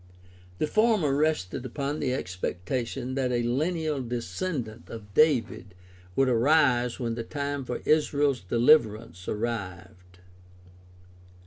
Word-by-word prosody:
The - - +1
former 215 -5 +2
rested 145 -9 0
upon 140 +3 -3
the 130 - 0
expectation 120 +4 -3
that 130 -2 0
a 120 -1 0
lineal 155 +4 -1
descendant 120 - -4
of 105 -3 -10
David 115 - +2 0.4
would 135 - +3
arise 125 -1 +3
when 120 -2 -2
the 115 - -4
time 140 +1 -3
for - - -5
Israel's 145 -4 +2
deHverance 110 - +2
arrived. 95 -5 -5
125 Hz, 110 wpm, -27 LUFS, 110-145 Hz, 0.4 s, would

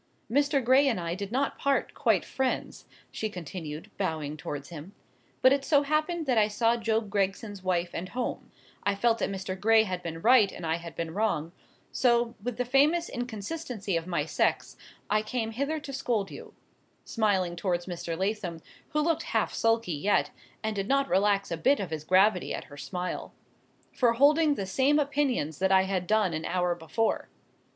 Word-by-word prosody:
Mr. 285 +1 +2
Gray 265 +3 +5
and 235 -8 +1
I 170 -1 -3
did 200 +2 -5
not 270 +3 -1
part 280 0 0
quite - - +2
friends," 265 -1 -3 0.2
she 220 - -3
continued, 165 0 -7
bowing 155 -6 -2
towards 145 -2 -6
him; 170 +4 -10 0.5
"but 260 - +7
it 275 -1 0
so 285 0 +3
happened 310 +3 0
that 250 -5 +3
I 210 - +4
saw 230 +2 +2
Job 220 -2 -1
Gregson's 200 0 -1
wife 180 -2 0
and 185 +2 -4
home,—I 235 -3 -4
felt 230 +3 +2
that - - 0
Mr. 190 -1 -4
Gray 220 +2 +5
had 185 -4 -4
been 165 -2 -5
right 230 -5 +6
and 170 - -7
I 160 +1 0
had 170 -1 -9
been 165 -1 -4
wrong, 190 -6 0 0.4
so, 235 -2 +2
with 240 +1 -4
the 250 - 0
famous 295 +7 +3
inconsistency 245 - -4
of 165 +1 -2
my 175 -2 0
sex, - - 0 0.3
I 215 +1 +2
came 225 +1 -3
hither 280 +7 -2
to 280 -2 -8
scold 230 -6 -1
you," - - -11 0.5
smiling 195 -6 +1
towards 175 -1 -1
Mr. 170 -2 -4
Lathom, 190 -4 -2 0.3
who 300 - 0
looked 325 +1 +1 0.2
half - - 0
sulky 225 -5 +1
yet, 190 +8 +1 0.3
and 220 0 -1
did 195 0 -2
not 275 +1 +2
relax 200 0 +2
a 170 - -1
bit 270 - +3
of 190 -5 -4
his 155 -1 -4
gravity 185 +2 +3
at - - -6
her - - -10
smile, 180 +3 -5 0.6
"for 240 -2 +3
holding 295 +4 +4
the 195 - -3
same 265 +10 +2
opinions 275 - 0
that 190 +1 +2
I 190 0 +6
had 190 -2 -2
done 215 -5 +2
an 155 +1 -3
hour 180 -1 +1
before. 175 +7 -1
210 Hz, 185 wpm, -28 LUFS, 180-255 Hz, 0.6 s, but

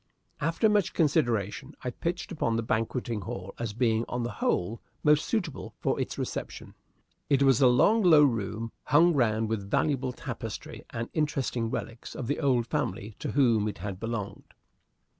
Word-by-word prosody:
After 165 +8 +2
much 210 -3 +2
consideration, 120 - 0
I 125 - -2
pitched 170 +6 -3
upon 130 -9 0
the 115 - 0
banqueting 115 0 -1
hall 95 0 -6
as 115 -3 -3
being, 115 -1 +2
on 125 0 -2
the 120 - -2
whole, 105 +2 -1 0.2
most 150 0 +4
suitable 180 - -3
for - - 0
its - - -4
reception. - - -5 0.6
It 140 -1 +4
was 135 -2 +4
a 130 - +7
long 205 - +4
low 160 -6 +7
room, 115 -3 0
hung 165 +4 +5
round 110 -5 +2
with 105 -3 -3
valuable 135 +1 +1
tapestry - - -7
and 115 0 -4
interesting 135 -7 -1
relics 115 +1 -5
of 130 - -4
the 145 - -1
old 130 -5 +2
family 105 -2 -3
to - - -4
whom 115 -7 +3
it 105 - -4
had 95 +1 -5
belonged. 115 -3 -5
120 Hz, 165 wpm, -28 LUFS, 110-145 Hz, 0.6 s, a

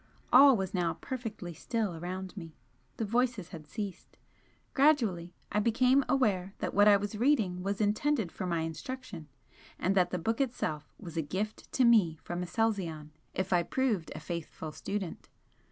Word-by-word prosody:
All 270 0 +9
was 190 +1 -3
now 175 -3 0
perfectly 225 -9 -6
still 215 0 -2
around 185 +3 -5
me 165 -5 -9 0.4
the 225 - -1
voices 230 -4 0
had 160 -4 -10
ceased. 200 -1 -6 0.6
Gradually 225 - +2 0.2
I 210 - +2
became 250 +5 +4
aware 195 -8 +1
that - - -3
what 205 +1 +6
I 205 -1 +8
was 205 +1 -4
reading 220 -9 +2
was 200 +1 -2
intended 215 - +1
for 185 - -4
my 170 -2 0
instruction, 170 - -6 0.5
and 190 - +1
that 180 -2 +3
the 180 - -2
book 225 +9 -1
itself 195 - -2
was 170 -5 -9
a - - +2
gift 195 +8 -4
to 255 - +4
me 205 -9 +5
from 175 +1 -4
Aselzion 180 -5 -1 0.2
if 190 +1 -1
I 175 - +4
proved 220 -5 -1
a - - -5
'faithful 165 -2 -6
student.' 195 +2 -5
195 Hz, 165 wpm, -31 LUFS, 175-230 Hz, 0.6 s, All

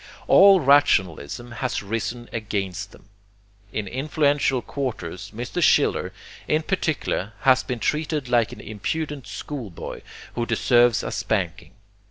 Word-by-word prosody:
All 195 -1 +7
rationalism 120 - +2
has 120 -1 -3
risen 115 +3 -4
against 100 -3 -3
them. 100 - -18 0.6
In 105 -1 -3
influential 140 +1 +1
quarters 105 - -5
Mr. 120 +3 -4
Schiller, - - +3 0.4
in 155 +1 +1
particular, 155 - -1
has 130 -1 +5
been 125 - -4
treated 150 +2 -1
like 120 -2 +2
an - - -9
impudent 140 +6 -4
schoolboy 120 - -7 0.3
who 120 -1 -2
deserves 120 0 +3
a - - -4
spanking. 95 -2 -2
120 Hz, 120 wpm, -24 LUFS, 105-140 Hz, 0.6 s, All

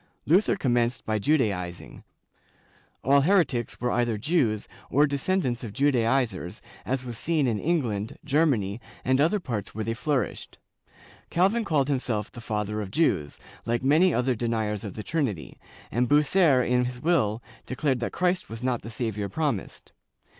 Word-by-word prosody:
Luther 185 +7 +4
commenced 120 - 0
by 110 -1 0
Judaizing; 100 - -1 1.0
all 140 +2 +5
heretics 155 - +1
were 125 0 0
either 120 -2 +1
Jews 115 -5 0 0.2
or 145 +4 +4
descendants 140 -3 -1
of 110 -4 -6
Judaizers, 120 -8 +1 0.3
as 130 0 -1
was 120 -2 -6
seen 160 -3 +1
in 115 -4 0
England, 115 -11 -1
Germany 130 -9 +1 0.2
and 130 +1 +3
other 170 +8 +3
parts 115 - -5
where 110 - -2
they 115 - -2
flourished; 125 - -2 0.7
Calvin 195 +7 +2
called 150 -8 +1
himself 125 -7 -1
the 120 - -10
Father 105 -1 -2
of 100 - -5
Jews, 95 - 0 0.3
like 120 +2 0
many 160 +7 +4
other 125 -1 +1
deniers 110 -2 -2
of 100 -4 -6
the 105 - -6
Trinity, 130 - -3 0.3
and 120 +1 +1
Bucer 150 -2 +4
in 125 0 +2
his 125 0 -5
will 125 -9 +1 0.2
declared 130 0 0
that 120 - -2
Christ 180 0 0
was 115 +2 -7
not 125 -2 0
the 115 - -8
Savior 110 -3 -3
promised. 150 -11 -3
125 Hz, 155 wpm, -26 LUFS, 110-150 Hz, 1.0 s, all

